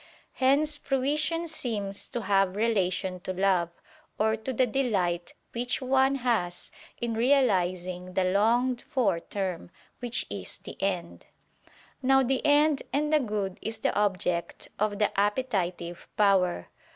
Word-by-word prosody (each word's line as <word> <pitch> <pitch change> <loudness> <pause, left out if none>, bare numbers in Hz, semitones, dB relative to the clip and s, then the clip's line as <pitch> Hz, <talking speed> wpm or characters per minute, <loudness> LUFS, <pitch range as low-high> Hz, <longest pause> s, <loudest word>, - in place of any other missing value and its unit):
Hence 290 +3 +2
fruition 300 +5 0
seems 210 -10 -4
to 240 - -3
have 195 -1 +2
relation 190 -4 0
to 185 +1 -4
love, 185 -2 +2 0.5
or 220 +1 +2
to 220 +4 -5
the 255 +1 +2
delight 195 -9 -1 0.2
which 245 +1 -2
one 265 +1 +3
has 230 -9 -1 0.3
in 235 -1 -2
realizing 185 -8 +1
the 190 - +3
longed 235 +7 +2
for 230 -10 0
term, 185 -2 -4 0.3
which 245 -1 0
is - - -6
the - - -10
end. 180 -3 -3 0.7
Now 270 +1 +4
the 260 +1 0
end 290 0 +4
and 300 +2 0
the 305 - +6
good 210 -6 -3
is 225 0 -4
the - - 0
object 185 -4 -1
of 210 0 0
the 210 0 +2
appetitive 195 -6 -1
power. 190 - +3
215 Hz, 135 wpm, -28 LUFS, 185-260 Hz, 0.7 s, the